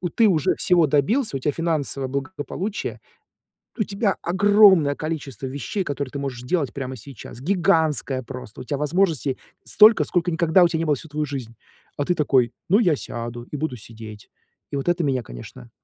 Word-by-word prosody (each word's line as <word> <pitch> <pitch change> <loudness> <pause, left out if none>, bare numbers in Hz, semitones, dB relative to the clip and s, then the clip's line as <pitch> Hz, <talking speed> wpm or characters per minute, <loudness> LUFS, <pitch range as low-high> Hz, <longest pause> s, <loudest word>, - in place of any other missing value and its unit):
Ты 230 - +5
уже 160 -7 +2
всего 175 -5 +3
добился, 150 - +1
у - - -7
тебя 145 +3 0
финансовое 150 -5 -2
благополучие, 145 +8 -4 0.8
у 215 - +2
тебя 200 0 -1
огромное 190 -5 +5
количество 145 -6 -5
вещей, 145 - -3
которые 140 -4 -4
ты - - -5
можешь 135 -3 -4
делать 140 -1 -1
прямо 130 -2 -5
сейчас. 120 0 -11
Гигантское 160 -6 +1
просто. 125 -3 -9
У - - -6
тя 145 +2 -2
возможностей 150 -3 0 0.3
столько, 215 +1 +6
сколько 175 -1 0
никогда 170 +2 +4
у - - +6
тя 170 - -2
не 165 - -1
было 150 -2 +2
всю 160 - -9
твою 150 0 -2
жизнь. 130 -5 -6 0.4
А 145 - 0
ты 180 - +2
такой- 130 -6 +2 0.2
ну, 200 +5 +5
я 175 -10 +3
сяду 120 -1 -6
и 145 +4 -7
буду 135 -4 -3
сидеть". 110 -1 -11 0.4
И - - -3
вот 140 +5 -1
это 175 0 +1
меня, 135 -4 0
конечно, - - -11
150 Hz, 180 wpm, -23 LUFS, 130-175 Hz, 0.8 s, столько